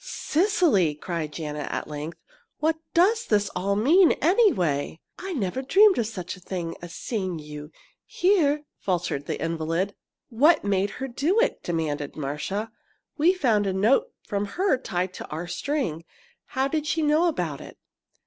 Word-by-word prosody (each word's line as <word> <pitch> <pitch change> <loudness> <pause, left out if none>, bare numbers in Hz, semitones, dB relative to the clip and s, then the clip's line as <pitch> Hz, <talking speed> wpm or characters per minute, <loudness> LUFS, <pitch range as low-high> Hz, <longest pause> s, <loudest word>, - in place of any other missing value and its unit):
"Cecily!" 325 - +2
cried 160 -1 -4
Janet, 150 -2 -5
at - - -3
length, 150 +2 -6 0.4
"what 315 +1 +1 0.2
does 425 +7 +4
this 205 -2 +2
all 200 +2 -1
mean, 320 - +5
anyway?" 185 - +2 0.2
"I 375 +1 -5
never 235 - -2
dreamed 385 +7 +5
of 225 - 0
such 185 -5 -6
a - - -15
thing 175 -2 -5
as 175 -1 -9
seeing 190 -7 -3
you 150 0 -9 0.4
here!" 310 -6 +2 0.2
faltered 175 -6 -2
the - - -3
invalid. 165 +4 -1 0.4
"What 290 +9 +4
made 200 0 +1
her 270 - -3
do 295 - +1
it?" - - +1
demanded 150 -4 -3
Marcia. 155 +10 -3 0.5
"We 345 +5 +4
found 225 - +2
a 190 - 0
note 255 - +2
from 205 -1 -2
her 380 -4 +3
tied 185 -7 -3
to - - -8
our 160 +3 -5
string. 175 - -2 0.4
How 265 0 -1
did 305 +1 -2
she 320 +1 0
know 305 +4 +3
about 175 - -2
it?" - - -11
205 Hz, 160 wpm, -25 LUFS, -, 0.5 s, mean